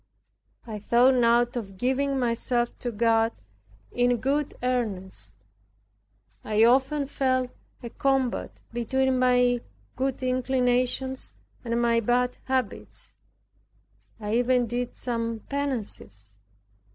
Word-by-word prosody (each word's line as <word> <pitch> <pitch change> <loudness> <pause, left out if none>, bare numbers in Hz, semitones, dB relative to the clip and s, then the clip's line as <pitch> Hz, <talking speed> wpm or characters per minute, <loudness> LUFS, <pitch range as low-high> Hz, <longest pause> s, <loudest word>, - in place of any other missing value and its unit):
I 215 -3 -6
thought 240 +5 +4
now 235 -1 +4
of 230 -6 -6
giving 270 +4 0
myself 240 0 0
to 245 - -3
God 225 +1 +2 0.6
in 245 0 +2
good 280 +5 -1
earnest. 215 -7 -2 1.1
I 215 +1 +2
often 270 +4 +3
felt 255 -2 0 0.3
a 235 - -6
combat 270 -3 -1
between 260 +2 +1
my 250 -1 +3 0.3
good 265 0 -2
inclinations 255 0 0 0.3
and 235 -1 -1
my 235 -1 +3
bad 245 +2 +1
habits. 260 -5 -3 1.1
I 210 +1 -1
even 245 0 +3
did 245 +1 -3
some 230 -2 -2
penances. 210 - -4
245 Hz, 105 wpm, -26 LUFS, 230-260 Hz, 1.1 s, thought